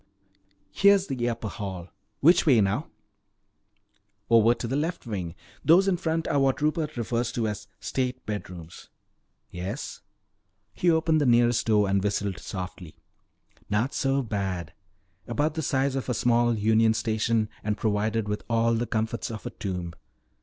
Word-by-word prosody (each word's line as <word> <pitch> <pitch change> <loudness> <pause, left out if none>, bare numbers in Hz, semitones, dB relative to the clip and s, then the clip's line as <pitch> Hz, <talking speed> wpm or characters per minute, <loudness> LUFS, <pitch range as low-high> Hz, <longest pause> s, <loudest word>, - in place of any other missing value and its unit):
Here's 200 - +4
the 125 -6 -1
upper 115 -1 -4
hall. 95 -5 -6 0.3
Which 170 +3 +5
way 130 -6 +6
now?" 95 -2 +1 1.4
"Over 115 +1 +6
to - - -5
the 130 - -2
left 165 +3 -2
wing. 90 -7 -4 0.3
These 180 +5 +5
in 190 -2 +2
front 165 -1 -1
are 145 - +2
what 135 -1 +2
Rupert 155 -1 -1
refers 120 0 -1
to 115 -2 0
as 105 -1 -5
'state 130 -1 -3
bedrooms.'" 90 -5 -7 0.6
"Yes?" 95 +9 -5 0.7
He 175 - +1
opened 160 -1 +3
the 145 - +2
nearest 120 -1 +3
door 105 -2 +3
and 95 0 +1
whistled 100 -2 -1
softly. 90 -3 -7 0.7
"Not 105 +6 0
so 135 0 +1
bad. 95 -7 -3 0.5
About 145 +6 0
the 160 - -3
size 135 -1 0
of 135 -1 -3
a 125 - 0
small 120 0 +2
union 110 +1 +3
station 110 0 0 0.2
and 105 0 -1
provided 110 0 0
with 105 0 -2
all 115 0 +2
the 115 +1 -1
comforts 110 +1 -2
of 110 -2 -7
a - - -4
tomb. 90 -4 -5
115 Hz, 155 wpm, -26 LUFS, 105-135 Hz, 1.4 s, way